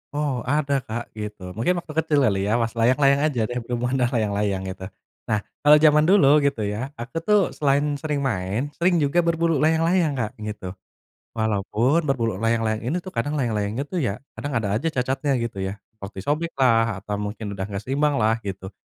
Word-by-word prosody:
Oh, 145 -4 -1
ada, 140 0 +1
Kak, 120 +2 -5
gitu. 105 -3 -6
Mungkin 115 - 0
waktu 155 - -9
kecil 160 -2 +2
kali 100 -3 +1
ya, 110 - +2
pas 115 -1 0
layang-layang 140 +4 +4
aja 130 -7 -1
deh, 120 +3 -2
berhubungan 125 +2 -2
dengan 125 +1 +1
layang-layang, 100 -3 0
gitu. 95 0 -8 0.4
Nah, 105 -1 +1 0.2
kalau 145 +1 +7
zaman 150 -1 +6
dulu, 150 -7 +6
gitu 140 -6 0
ya, 110 +8 -4
aku 130 +7 -5
tuh 210 +5 +3
selain 140 0 +1 0.2
sering 150 -2 -2
main, 115 +3 -2
sering 175 +1 +3
juga 145 +5 +2
berburu 165 -2 +1
layang-layang, 160 0 +2
Kak, 110 -4 -2
gitu. 105 -3 -6 0.6
Walaupun 110 +8 +1
berburu 115 -8 0
layang-layang 115 0 0
ini 145 +8 0
tuh 185 - -8
kadang 145 +1 -2
layang-layangnya 110 -3 -1
tuh 185 - -2
ya, 115 -8 -2 0.2
kadang 145 - -4
ada 115 -3 0
aja 140 - -4
cacatnya, 135 -1 0
gitu 115 -4 -4
ya, 95 - -4 0.2
seperti 100 -1 -9
sobek 155 - -1
lah, 115 -6 +2
atau 105 0 -3
mungkin 105 +1 -5
udah 95 -1 -4
enggak 100 0 -5
seimbang 145 +5 +1
lah, 115 -2 +2
gitu. 95 -1 -5
125 Hz, 190 wpm, -23 LUFS, 105-145 Hz, 0.6 s, kalau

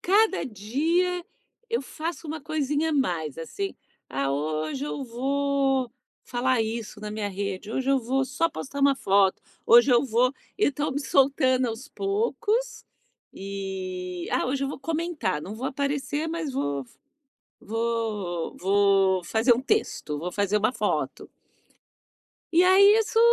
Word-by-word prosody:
cada 405 +1 +3
dia 320 - 0 0.5
eu 460 - 0
faço 325 +4 -5
uma 310 +1 -5
coisinha 300 +1 -1
a - - -1
mais, 170 - 0
assim: 390 - -4 0.3
"Ah, 135 +1 -1
hoje 155 - -2
eu 290 - -4
vou 270 +1 0 0.3
falar 250 0 +1
isso 220 -1 -5
na 210 0 -5
minha 210 -1 -3
rede. 200 +1 -4
Hoje 265 +1 0
eu 275 - +4
vou 260 +3 0
só 295 +6 0
postar 280 -1 -6
uma 275 0 +5
foto. 195 -5 +2 0.3
Hoje 240 +3 +7
eu 240 +1 +5
vou" 250 +1 +2 0.3
Eu 415 - +3
tô 295 +3 -2
me 280 +1 -2
soltando 265 -2 +3
aos 230 +5 -6
poucos, 440 +5 -1 0.5
e: 185 -2 -5
"Ah, - - +1
hoje 270 +2 -1
eu - - -2
vou - - -6
comentar, 320 - -2
não 200 - -6
vou 255 - -3
aparecer, 285 +3 -2
mas 320 -3 -3
vou 145 - -2
v - - -25 0.7
vou 220 -6 -2
vou 195 -1 +3
fazer 225 +7 +3
um 240 - -2
texto, 270 - -1
vou 175 +2 -4
fazer 200 +2 +1
uma 215 +3 +2
foto". - - -2 1.2
E 350 +2 +5
aí 400 +3 +7
isso 445 0 0
255 Hz, 150 wpm, -26 LUFS, 200-295 Hz, 1.2 s, Hoje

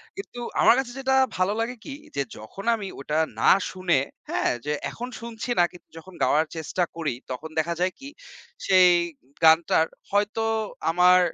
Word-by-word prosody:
কিন্তু 390 -11 -8 0.2
আমার - - +7
কাছে 260 -2 -3
যেটা 265 0 +1 0.2
ভালো 185 +2 +2
লাগে 235 +2 -2
কি, 280 - -6 0.2
যে 140 - +1 0.2
যখন 110 - -10
আমি 210 -3 -6
ওটা 150 +3 -1 0.2
না - - +6 0.2
শুনে 185 -6 +1 0.3
হ্যাঁ? - - +1
যে 150 - 0 0.2
এখন 245 - -6
শুনছি 230 0 -7
না - - +7
কিন্তু 180 - -16
যখন 185 +3 -12
গাওয়ার 155 +2 +3
চেষ্টা 160 +3 -1
করি 160 -5 -2 0.2
তখন 145 +5 -5
দেখা 170 +2 0
যায় 180 +1 +1
কি, 275 0 -9 0.6
সেই 185 -1 +6 0.6
গানটার 160 0 +5 0.3
হয়তো 205 +2 +1 0.5
আমার 180 +2 +6
185 Hz, 165 wpm, -25 LUFS, 160-225 Hz, 0.6 s, আমার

